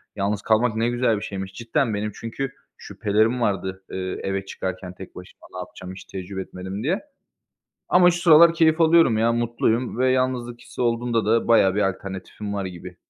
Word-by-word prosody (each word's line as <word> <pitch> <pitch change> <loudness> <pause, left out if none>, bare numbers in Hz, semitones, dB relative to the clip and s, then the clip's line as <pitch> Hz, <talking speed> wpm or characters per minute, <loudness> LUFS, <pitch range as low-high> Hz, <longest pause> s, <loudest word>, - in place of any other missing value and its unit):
Yalnız 100 0 -1
kalmak 110 +2 +2
ne 115 +2 +1
güzel 120 -3 +1
bir - - -6
şeymiş." 95 -1 -6
Cidden 115 +1 -1
benim 105 +1 -2
çünkü 125 +4 -5 0.3
şüphelerim 110 +4 0
vardı, 95 -2 -2
ııı, 95 - -4 0.2
eve 95 0 -3
çıkarken 95 -1 -5
tek 95 0 -12
başıma. 90 - -13
Ne - - -7
yapacağım 90 +1 -8
hiç 95 - -10
tecrübe 95 0 -6
etmedim 95 +3 -7
diye. 180 +8 0 0.9
Ama 180 0 +6
şu 175 0 -3
sıralar 165 0 +7
keyif 160 -1 +3
alıyorum 160 -9 +5
ya, 115 +1 +3
mutluyum 120 +1 0
ve 130 0 +3
yalnızlık 125 -2 -1
hissi - - -11
olduğunda 115 -1 0
da 115 +2 +1
bayağı 100 -5 +5
bir 105 - +1
alternatifim 95 +2 -6
var 100 - -2
gibi. 90 0 -9
110 Hz, 180 wpm, -23 LUFS, 95-125 Hz, 0.9 s, sıralar